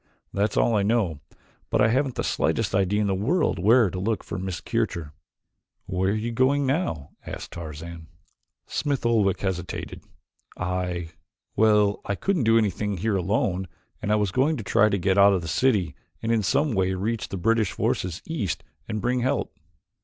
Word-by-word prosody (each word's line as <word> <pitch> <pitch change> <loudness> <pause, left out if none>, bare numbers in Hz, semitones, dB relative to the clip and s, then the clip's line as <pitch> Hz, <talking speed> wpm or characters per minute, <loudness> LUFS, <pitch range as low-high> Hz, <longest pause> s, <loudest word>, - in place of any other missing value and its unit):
That's 100 +1 0
all 115 - +3
I 105 - +3
know, 100 -7 +1 0.5
but - - +1
I 110 - +5
haven't 130 +2 +1
the - - -2
slightest - - 0
idea 100 +2 +2
in - - +1
the 100 - +1
world 125 - +1
where 110 +1 +5
to 90 - -4
look 110 +3 -1
for 95 - -5
Miss 95 -2 -4
Kircher." 80 -3 -2 0.7
"Where 95 0 0
were 100 - +1
you 115 +2 -2
going 135 +4 +2
now?" 130 - -1
asked - - -7
Tarzan. 80 0 -8 0.6
Smith 140 -4 -2
Oldwick 110 -5 +2
hesitated. 90 -3 -4 0.6
"I 90 -2 -2 0.5
well, 105 -2 +3
I 100 - -2
couldn't 180 - 0
do 115 0 +5
anything 105 -1 0
here 105 +3 0
alone 95 0 0 0.3
and 105 -1 -1
I - - +5
was 105 -3 +1
going 145 - +2
to 115 - -5
try 105 +2 +4
to 100 - +1
get 95 +1 +2
out 100 0 +7
of 90 -3 0
the - - -5
city 95 +1 +2 0.3
and 115 - 0
in 115 -1 +3
some 140 +9 +1
way 95 -2 +1
reach 105 +2 -2
the 95 - -4
British 110 +2 +2
forces 90 -2 -2
east 140 - -3 0.2
and 110 -1 -3
bring 125 +1 +1
help." 125 +2 -1
100 Hz, 185 wpm, -25 LUFS, 90-115 Hz, 0.7 s, out